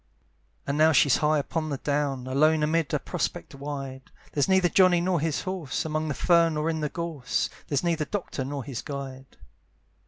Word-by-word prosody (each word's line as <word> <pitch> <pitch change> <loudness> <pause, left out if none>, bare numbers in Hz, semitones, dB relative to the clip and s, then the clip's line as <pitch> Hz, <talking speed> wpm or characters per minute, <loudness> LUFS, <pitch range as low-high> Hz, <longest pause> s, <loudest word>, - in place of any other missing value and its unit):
And 140 +2 -1
now 160 +1 +6
she's 140 -1 +5
high 155 0 +2
upon 155 +2 -2
the 140 - -2
down, 140 -2 -1
Alone 150 +4 +3
amid 160 0 +1
a - - +2
prospect - - -4
wide; 135 -2 -6 0.2
There's 145 - +1
neither 190 -1 +4
Johnny 180 +1 +5
nor 180 0 +1
his 155 -1 -1
horse, 185 -8 -3
Among 155 0 -1
the 150 - -2
fern 165 -1 +3
or 155 +2 0
in 160 - -3
the 150 -1 -1
gorse; 160 -6 -2 0.2
There's 145 +1 0
neither 165 -3 0
doctor 180 -8 -4
nor 140 0 -4
his 130 -3 -5
guide. 135 -2 -7
150 Hz, 185 wpm, -26 LUFS, 140-165 Hz, 0.2 s, now